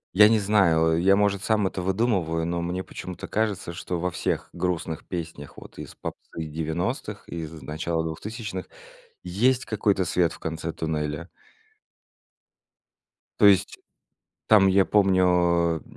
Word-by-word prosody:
Я 105 +2 +8
не 115 - +4
знаю, 95 -6 +3
а, - - +3
я, 95 +4 +4
может, 100 -1 +1
сам 105 -3 +2
это 95 -1 -2
выдумываю, 95 -5 0
но 85 0 -2
мне 90 +2 -3
почему-то 90 -1 -8
кажется, 105 -5 -2
что 85 0 -4
во 90 +1 -1
всех - - -2
грустных 85 -3 -3
песнях 80 -5 -6
вот - - -13
из - - -9
попсы 80 - -7
90-х, 85 - -3
и 85 - -7
из 80 -1 -5
начала 80 +3 -2
2000-х, 95 +3 -6 0.5
есть 120 +9 +1
какой-то 100 -4 +1
свет 85 -2 +1
в - - -12
конце 80 0 -4
туннеля. 75 +1 -3 2.1
То 105 - +6
есть, 100 -2 +3 0.7
там 105 -3 +6
я 95 0 +5
помню, 90 -4 +3
90 Hz, 140 wpm, -25 LUFS, 80-100 Hz, 2.1 s, Я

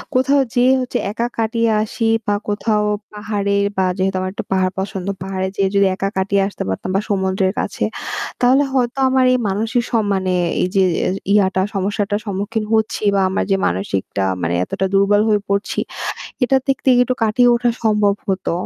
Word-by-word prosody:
কোথাও 275 +2 +3
যেয়ে 250 +1 +4
হচ্ছে 250 - -2
একা 230 +3 -2
কাটিয়ে 230 0 +1
আসি 220 +2 -5 0.2
বা 205 - +2
কোথাও 210 0 0 0.3
পাহাড়ের 200 -1 -1
বা 190 - +3
যেহেতু 190 0 0
আমার 185 0 -3
একটু - - -5
পাহাড় 185 -1 +2
পছন্দ, 190 -1 -4 0.2
পাহাড়ে 190 0 -2
যেয়ে 195 -1 +1
যদি 200 0 +4
একা 195 - -2
কাটিয়ে 195 +1 +1
আসতে 200 - -5
পারতাম 95 - -3
বা 195 - +2
সমুদ্রের 190 -1 0
কাছে। - - -3 0.6
তাহলে 255 +3 +5
হয়তো 250 -1 0
আমার 260 0 +3
এই - - +3
মানসিক 225 +5 0
সম্মানে 200 -5 0 0.3
এই - - +2
যে 195 - +4 0.2
অ্যা - - 0 0.2
ইয়াটা 190 -2 +3
সমস্যাটার 205 +1 -1
সম্মুখীন 205 +2 -2
হচ্ছি 220 -1 0
বা 195 - +3
আমার 190 - 0
যে - - +5
মানসিকটা 95 +2 -2 0.2
মানে 85 0 -1
এতটা 190 - -2
দুর্বল 200 +1 +4
হয়ে 210 -1 +2
পড়ছি 200 +1 -1 0.6
এটার 265 +1 +3
দিক 270 - +2
দিয়ে 260 -2 +5
একটু 255 +1 -1
কাটিয়ে 245 +3 +4
ওঠা 240 0 +1
সম্ভব 210 -2 +3
হতো। 190 -1 -1
205 Hz, 175 wpm, -19 LUFS, 190-230 Hz, 0.6 s, তাহলে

